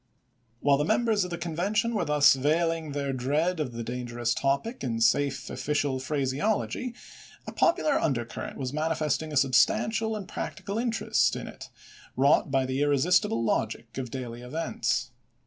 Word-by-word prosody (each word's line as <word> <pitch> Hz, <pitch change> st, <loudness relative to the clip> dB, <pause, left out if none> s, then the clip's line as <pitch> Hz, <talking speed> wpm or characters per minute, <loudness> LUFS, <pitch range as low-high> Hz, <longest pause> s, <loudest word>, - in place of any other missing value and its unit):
While 140 Hz, -1 st, +4 dB
the -, -, +2 dB
members 220 Hz, +4 st, +2 dB
of 180 Hz, -, -4 dB
the 175 Hz, -, -4 dB
Convention 190 Hz, +8 st, -1 dB
were 205 Hz, -6 st, 0 dB
thus 150 Hz, -1 st, +5 dB
veiling 160 Hz, +2 st, 0 dB
their 140 Hz, -1 st, -2 dB
dread 150 Hz, +7 st, 0 dB
of 145 Hz, -5 st, -2 dB
the 115 Hz, 0 st, -5 dB
dangerous 120 Hz, -1 st, -2 dB
topic 140 Hz, -, -1 dB
in 115 Hz, -3 st, -2 dB
safe 135 Hz, +5 st, +2 dB
official 145 Hz, -2 st, -1 dB
phraseology, 150 Hz, -, -1 dB, 0.5 s
a -, -, -6 dB
popular 310 Hz, -3 st, +2 dB
undercurrent 120 Hz, -6 st, -3 dB
was 130 Hz, 0 st, -4 dB
manifesting 155 Hz, 0 st, -1 dB
a 145 Hz, -, -1 dB
substantial 175 Hz, -, +2 dB
and 205 Hz, -3 st, -6 dB
practical 200 Hz, +3 st, -4 dB
interest 235 Hz, -1 st, +1 dB
in -, -, -6 dB
it, -, -, -10 dB, 0.5 s
wrought 140 Hz, +2 st, +4 dB
by 135 Hz, -1 st, +1 dB
the 130 Hz, +2 st, -2 dB
irresistible 145 Hz, -4 st, +2 dB
logic 115 Hz, +1 st, -2 dB
of 125 Hz, -2 st, -4 dB
daily 120 Hz, -2 st, -6 dB
events. 155 Hz, +7 st, -2 dB
145 Hz, 150 wpm, -27 LUFS, 130-175 Hz, 0.5 s, thus